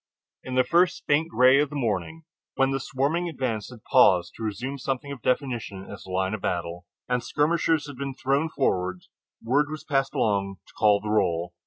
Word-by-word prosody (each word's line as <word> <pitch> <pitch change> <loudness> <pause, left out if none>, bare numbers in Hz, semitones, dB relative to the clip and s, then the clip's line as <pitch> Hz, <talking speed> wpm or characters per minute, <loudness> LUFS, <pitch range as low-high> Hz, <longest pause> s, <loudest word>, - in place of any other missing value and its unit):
In 130 - -5
the 130 - +5
first 170 +7 +2
faint 155 +3 +2
gray 130 -2 +5
of 150 - 0
the 150 - -8
morning, 120 - -2 0.3
when 135 0 +2
the 135 - -1
swarming 145 +7 -1
advance 125 -8 -3
had 120 -4 -13
paused 90 -3 +4
to - - -12
resume 125 +6 -4
something 135 +2 -3
of 135 -4 -7
definition 120 -8 -2
as - - -10
a - - -11
line 95 +2 -1
of 110 - -4
battle, 85 -1 -3 0.2
and 125 -1 0
skirmishers 160 0 +1
had 145 -3 -9
been 135 0 -4
thrown 140 +5 0
forward, 95 - -1 0.4
word 140 +6 +2
was 155 0 -6
passed 135 -1 0
along 100 -6 0
to - - -20
call 105 -2 +3
the 105 - -5
roll. 85 -4 0
130 Hz, 195 wpm, -26 LUFS, 100-140 Hz, 0.4 s, the